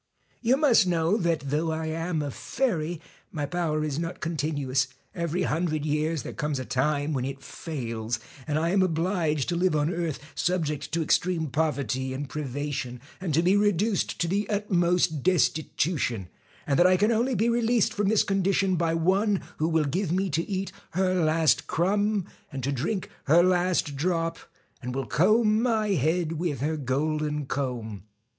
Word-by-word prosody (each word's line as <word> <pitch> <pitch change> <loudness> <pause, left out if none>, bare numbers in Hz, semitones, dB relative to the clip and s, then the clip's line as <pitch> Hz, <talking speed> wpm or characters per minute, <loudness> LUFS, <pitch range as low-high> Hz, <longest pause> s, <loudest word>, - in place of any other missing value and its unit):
You 250 +3 +3
must 245 -10 +5
know 170 +2 +2
that 165 -8 -1
though 160 +2 +1
I 160 0 -2
am 160 0 -2
a 145 - -3
fairy, 175 - -2 0.3
my 145 -2 -2
power 155 0 -1
is 150 -1 -2
not 170 +2 -4
continuous, 145 -5 -1 0.3
every 170 +1 -1
hundred 155 -2 -1
years 155 0 0
there - - -6
comes 150 -3 -2
a 130 - -4
time 145 +3 0
when 130 -3 -1
it 135 +1 -5
fails, 120 -5 -4 0.3
and 150 -1 0
I 165 +2 +1
am 195 0 +3
obliged 165 -4 0
to 175 - 0
live 175 -1 +2
on 150 +3 +1
earth 170 -4 -2 0.2
subject 160 -5 -1
to 165 0 +1
ex - - +4
treme 165 -5 -2
poverty 130 -3 -1
and 145 +2 -4
privation, 140 -3 -4 0.2
and 185 -3 -3
to 165 - +3
be 185 +3 +4
reduced 205 0 +1
to 170 - +1
the 200 +4 -1
utmost 180 -6 +1
destitution, 155 - 0 0.4
and 140 - +1
that 175 - +7
I 185 0 +4
can 210 +4 +3
only 240 +3 +1
be 225 - +2
released 235 -2 +2
from 205 -3 0
this 215 0 +4
condition 195 -1 +1
by 165 -1 +1
one 190 +4 +2
who 155 - +1
will 160 -2 +2
give 175 +5 -1
me 190 +1 0
to 160 - +1
eat 195 -1 -2 0.2
her 185 +1 +2
last 160 -3 +2
crumb, 205 +3 +1 0.3
and 135 -2 -5
to 140 - 0
drink 170 - -2
her 165 +4 +6
last 180 -4 +1
drop, 165 +1 0 0.4
and 125 0 -5
will 135 -1 -2
comb 215 - +3
my 220 -3 +1
head 165 -1 0
with 160 -7 -1
her 155 +3 0
golden 150 +2 -1
comb. 120 -8 -4
165 Hz, 175 wpm, -27 LUFS, 145-185 Hz, 0.4 s, that